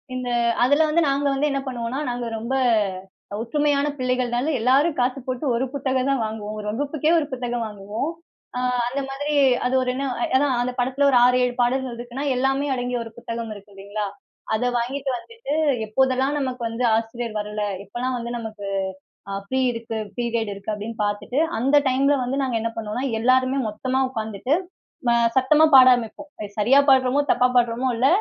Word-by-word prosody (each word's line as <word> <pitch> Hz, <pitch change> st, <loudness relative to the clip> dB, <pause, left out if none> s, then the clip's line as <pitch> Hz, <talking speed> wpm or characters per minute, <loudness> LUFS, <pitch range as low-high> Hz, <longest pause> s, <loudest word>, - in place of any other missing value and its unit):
இந்த 255 Hz, -1 st, -3 dB, 0.3 s
அதுல 285 Hz, +5 st, +4 dB
வந்து 330 Hz, +3 st, +3 dB
நாங்க 280 Hz, +1 st, 0 dB
வந்து 280 Hz, +2 st, +1 dB
என்ன 275 Hz, -, 0 dB
பண்ணுவோனா, 250 Hz, 0 st, -3 dB
நாங்க 245 Hz, 0 st, -3 dB
ரொம்ப 235 Hz, +4 st, -2 dB, 0.9 s
ஒற்றுமையான 290 Hz, +4 st, +1 dB
பிள்ளைகள்னால, 255 Hz, +2 st, 0 dB
எல்லாரும் 275 Hz, +7 st, +3 dB
காசு 250 Hz, +2 st, +1 dB
போட்டு 255 Hz, +2 st, -3 dB
ஒரு 245 Hz, +3 st, 0 dB
புத்தகம் 265 Hz, -1 st, 0 dB
தான் 275 Hz, -3 st, +1 dB
வாங்குவோம். 215 Hz, -1 st, -5 dB
ஒரு 210 Hz, -, -6 dB
வகுப்புக்கே 290 Hz, +6 st, -1 dB
ஒரு 305 Hz, -, -2 dB
புத்தகம் 245 Hz, -2 st, -2 dB
வாங்குவோம். 210 Hz, +7 st, -4 dB, 0.5 s
அ, -, -, 0 dB, 0.3 s
அந்த 275 Hz, +3 st, -2 dB
மாதிரி 290 Hz, +2 st, -3 dB, 0.3 s
அது 250 Hz, +1 st, +1 dB
ஒரு 255 Hz, -, -1 dB
என்ன 275 Hz, +1 st, -2 dB, 0.3 s
ஏன்னா, 285 Hz, +2 st, +4 dB
அந்த 250 Hz, +1 st, -2 dB
படத்தில 265 Hz, +3 st, +2 dB
ஒரு 255 Hz, -, +5 dB
6, 250 Hz, 0 st, +4 dB
7 245 Hz, -, -2 dB
பாடல்கள் 250 Hz, 0 st, 0 dB
இருக்குன்னா, 245 Hz, +4 st, -5 dB
எல்லாமே 270 Hz, +3 st, +1 dB
அடங்கிய 245 Hz, 0 st, -2 dB
ஒரு 225 Hz, -, -10 dB
புத்தகம் 230 Hz, -1 st, -5 dB
இருக்கு 205 Hz, 0 st, -14 dB
இல்லீங்களா? 200 Hz, +1 st, -4 dB, 0.5 s
அத 220 Hz, -, -1 dB
வாங்கிட்டு 265 Hz, +4 st, -2 dB
வந்துட்டு, 460 Hz, -, -7 dB, 0.3 s
எப்போதெல்லாம் 265 Hz, +4 st, +1 dB
நமக்கு 255 Hz, -2 st, -3 dB
வந்து 230 Hz, +2 st, -3 dB
ஆசிரியர் 225 Hz, 0 st, -3 dB
வரல. 210 Hz, 0 st, -4 dB, 0.2 s
எப்பலாம் 245 Hz, +5 st, -3 dB
வந்து 235 Hz, 0 st, -5 dB
நமக்கு, 220 Hz, -3 st, -7 dB, 0.6 s
அ -, -, -4 dB
ஃப்ரீ 260 Hz, +6 st, -1 dB
இருக்கு 230 Hz, -1 st, -5 dB, 0.2 s
பீரியட் 235 Hz, -3 st, -1 dB
இருக்கு 200 Hz, +2 st, -5 dB
அப்டீன்னு 215 Hz, +2 st, -5 dB
பார்த்துட்டு, 205 Hz, +6 st, -2 dB, 0.2 s
அந்த 275 Hz, +5 st, +4 dB
டைம்ல 275 Hz, +2 st, +3 dB
வந்து 260 Hz, +3 st, -2 dB
நாங்க 250 Hz, -3 st, 0 dB
என்ன 230 Hz, 0 st, -2 dB
பண்ணுவோன்னா, 225 Hz, +4 st, -3 dB, 0.2 s
எல்லாருமே 255 Hz, +2 st, +3 dB
மொத்தமா 255 Hz, +5 st, -1 dB
உட்காந்துட்டு, 220 Hz, +2 st, -1 dB, 0.5 s
ம -, -, +5 dB, 0.3 s
சத்தமா 300 Hz, +4 st, +5 dB
பாட 260 Hz, -1 st, +9 dB
ஆரமிப்போம். 245 Hz, +5 st, -7 dB
அது 210 Hz, -1 st, -5 dB
சரியா 250 Hz, +7 st, +5 dB
பாடுறமோ, 265 Hz, +1 st, +4 dB
தப்பா 250 Hz, -, +4 dB
பாடுறோமோ 240 Hz, +1 st, +2 dB
இல்ல, 255 Hz, +3 st, +3 dB
250 Hz, 170 wpm, -23 LUFS, 230-270 Hz, 0.9 s, பாட